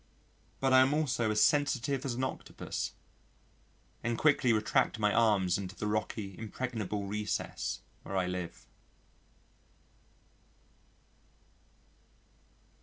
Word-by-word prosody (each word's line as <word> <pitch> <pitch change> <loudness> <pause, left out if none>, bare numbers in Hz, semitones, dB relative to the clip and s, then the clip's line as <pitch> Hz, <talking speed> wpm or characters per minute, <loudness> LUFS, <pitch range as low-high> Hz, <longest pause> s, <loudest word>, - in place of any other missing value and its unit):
but 135 -1 +2
I 130 - +8
am 135 +3 +4
also 130 -7 +1
as 105 0 +4
sensitive 140 -3 +2
as 125 -3 -1
an 130 - -2
Octopus, 130 - -4 1.1
and 115 0 0
quickly 140 -5 +4
retract 110 +1 +2
my 105 -1 +2
arms 100 -6 +3
into 95 0 -6
the - - -4
rocky, 105 -2 -2
impregnable 110 -3 -3
recess 105 +1 -3 0.2
where 95 - -4
I 95 - +2
live. 90 -1 -5
110 Hz, 105 wpm, -32 LUFS, 100-130 Hz, 1.1 s, I